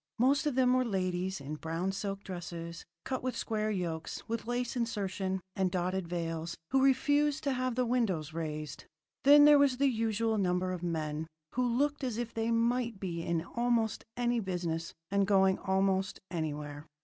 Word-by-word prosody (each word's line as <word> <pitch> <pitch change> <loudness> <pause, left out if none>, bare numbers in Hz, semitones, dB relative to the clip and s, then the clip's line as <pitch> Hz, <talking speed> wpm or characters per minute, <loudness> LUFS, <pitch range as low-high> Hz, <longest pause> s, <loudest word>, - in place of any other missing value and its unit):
Most 280 +5 +3
of 290 - 0
them 255 -1 +4
were 255 0 +3
ladies 185 -3 -1
in 145 +2 -6
brown 165 +4 -2
silk 195 0 -4
dresses 170 -2 -6 0.2
cut 260 -1 -2
with 255 0 -2
square 215 -1 -1
yokes, 170 -5 -3
with 230 0 -3
lace 245 +1 -1
insertion, 195 -5 -2
and 190 -2 +1
dotted 180 0 -1
veils, 165 -1 -3
who 270 0 +4
refused 290 +2 +3
to 280 -2 +1
have 255 -1 -1
the 250 0 +1
windows 195 - 0
raised. 155 -2 -5 0.4
Then 290 +1 +9
there 295 -1 +8
was 275 -3 +4
the 280 - +2
usual 225 -2 0
number 180 -1 +1
of 180 - -5
men 160 -2 -2 0.3
who 250 - +1
looked 285 +4 0
as 245 -4 -2
if 235 -1 -3
they 225 0 -1
might 235 -1 +1
be 170 -4 -3
in 165 -1 -1
almost 235 0 0
any 240 -1 +1
business 175 -4 -3 0.2
and 200 -1 +2
going 190 -1 +4
almost 190 0 +1
anywhere. 150 -2 -4
195 Hz, 175 wpm, -31 LUFS, 175-245 Hz, 0.4 s, Then